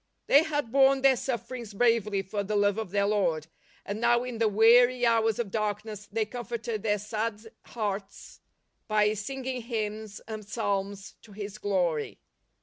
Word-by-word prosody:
They 285 - +6
had 295 -7 -2
borne 270 0 +4
their 270 -1 +6
sufferings 235 -3 -5
bravely 210 -3 +2
for 200 +2 -3
the 205 +1 -3
love 205 +1 +2
of 220 -4 -4
their 200 +1 +1
Lord, 180 -7 +1 0.4
and 205 +2 -4
now 240 0 +3
in 250 -3 -6
the 225 - +3
weary 240 +4 +5
hours 225 -2 +3
of 230 -5 -3
darkness 210 0 -3
they 220 +1 0
comforted 235 -1 -5
their 210 -1 +1
sad 215 +1 -4
hearts 200 -3 -5 0.5
by 210 -1 +3
singing 255 +4 -4
hymns 215 -2 -4
and 215 -1 -6
psalms 200 -2 -3
to 210 - -16
His 205 0 -7
glory. 175 -7 -1
215 Hz, 155 wpm, -28 LUFS, 205-235 Hz, 0.5 s, They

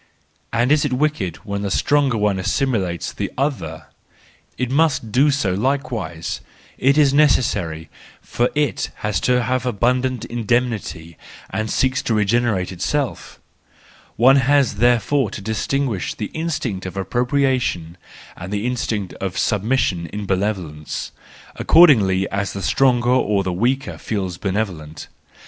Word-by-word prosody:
And 120 +3 +1
is 150 -1 +4
it 145 -3 -1
wicked 125 - 0
when 100 -1 -3
the 100 - -2
stronger 140 +4 +2
one 105 -2 +1
assimilates 95 - -1
the - - -4
other? 80 - -2 0.7
It 125 -1 -2
must 140 -6 +1
do 135 +6 +4
so 135 -10 +1
likewise: 110 - -2 0.4
it 140 +3 +3
is 145 -3 +4
necessary, 100 - +2 0.3
for 120 +1 -1
it 150 -1 0 0.2
has 105 - 0
to 125 -1 +2
have 130 +1 0
abundant 125 +1 0
indemnity 115 -8 -2 0.3
and 110 +3 -2
seeks 130 +3 +1
to 115 - -1
regenerate 105 -3 +1
itself. 135 +10 -3 0.8
One 130 +4 +6
has 135 -1 +2
there¬ 120 0 +4
fore 135 +2 0
to - - -7
distinguish 110 +2 -2
the 105 - -5
instinct 130 - -3
of 95 - -8
appropriation, 120 - 0 0.4
and 90 +2 -8
the 105 +2 -2
instinct 115 -6 -2
of 95 -2 -3
submission, 105 -5 0
in 105 +2 -6
benevolence, 95 -6 -3 0.5
according 105 - +5
as 100 -1 -2
the 100 - -5
stronger 125 +2 +2
or 105 -6 +2
the 90 -1 -2
weaker 125 +8 -1
feels 95 -5 -3
benevolent. 95 -7 -4
115 Hz, 135 wpm, -20 LUFS, 95-130 Hz, 0.8 s, One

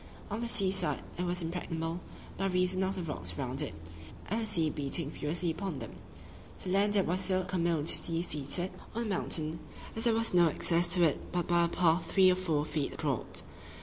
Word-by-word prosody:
On 215 +3 -2
the 235 - -2
sea 195 -5 +2
side 190 -2 0 0.2
it 180 - 0
was 175 0 -1
impregnable, 165 0 -3 0.4
by 195 - -1
reason 185 0 +1
of 190 +1 -1
the 180 - -4
rocks 90 - -3
round 130 +2 -2
it, 150 - -4 0.5
and 220 +4 -1
the 220 - -3
sea 165 -7 +2
beating 145 +1 -2
furiously 165 +3 0
upon 185 -2 -4
them. - - -7 0.7
To 185 - -4
the - - 0
land 205 +1 +3
it 195 - +4
was 180 +3 0
so 185 -1 +1
commodiously 170 -2 +1
seated 155 +4 -1 0.2
on 235 - -1
a - - -4
mountain, 165 -5 0 0.4
as 225 - -1
there 230 -2 +4
was 225 -2 +2
no 175 -2 +6
access 170 +3 +3
to 175 - +3
it 155 -4 0
but 175 -1 -1
by 170 0 +3
a - - +1
path 170 0 +1
three 190 -1 +6
or - - +2
four 160 -5 0
feet 150 -2 -2
broad. - - -1
175 Hz, 210 wpm, -31 LUFS, 160-190 Hz, 0.7 s, no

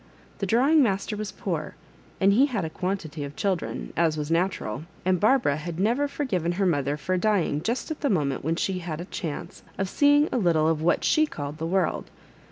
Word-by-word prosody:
The 195 - -1
£rawing 265 +10 +4
master 210 -4 +1
was 210 -2 -4
poor, 165 -6 -4 0.4
and 195 +1 +4
he 265 +7 +5
had 215 - -2
a 160 - -5
quantity 170 -5 -3
of 140 0 -7
children, 190 -4 -2
as 160 -2 +2
was 150 +1 -3
natural, 165 - -1 0.2
and 185 -1 +2
Bar 240 +8 +5
bara 145 - 0
had 165 +2 -6
never 240 +9 +2
forgiven 185 - -1
her 195 +2 0
mother 145 -4 +1
for 185 +6 -1
dying 180 -7 +1
Just 235 - -2
at 315 - -5
the 285 - +1
moment 145 -8 0
when 160 +3 0
she 185 +2 -1
had 165 -3 -5
a 175 - -5
chance 175 -1 -6 0.2
of 195 - -1
seeing 290 +7 +4
a 250 - +1
little 165 -5 +3
of 160 -1 +1
what 175 +2 +2
she 310 0 +3
called 145 - -6
the 165 - -2
world. 185 -3 0
180 Hz, 210 wpm, -26 LUFS, 160-215 Hz, 0.4 s, he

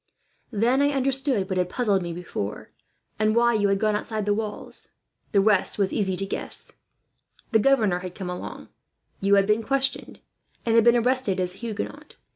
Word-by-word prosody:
Then 240 +5 +2
I 285 - +4
understood 270 -6 0
what 190 -1 -2
had 180 0 0
puzzled 205 -3 +1
me 170 -1 -4
before, 165 - -5 0.5
and 215 0 +2
what 235 -1 +3
you 205 - +3
had 195 0 +2
gone 215 0 +2
outside 215 0 -3
the 205 - +2
walls 210 0 -5
for. - - -31 0.4
"The 200 - +5
rest 205 -2 +2
was 195 -2 0
easy 190 -3 0
to 195 - -1
guess. 195 - -4 0.8
The 220 - +5
governor 215 -7 +3
had 180 -1 -7
come 190 -3 -6
along, 180 0 -7 0.5
you 200 +1 +3
had 195 -1 +4
been 210 +2 +2
questioned, 270 +3 -1 0.5
and 230 - +2
had 230 0 +6
been 235 0 +6
arrested 245 -5 +1
as 180 -1 0
a - - -15
Huguenot. 225 -3 -6
210 Hz, 190 wpm, -25 LUFS, 195-235 Hz, 0.8 s, had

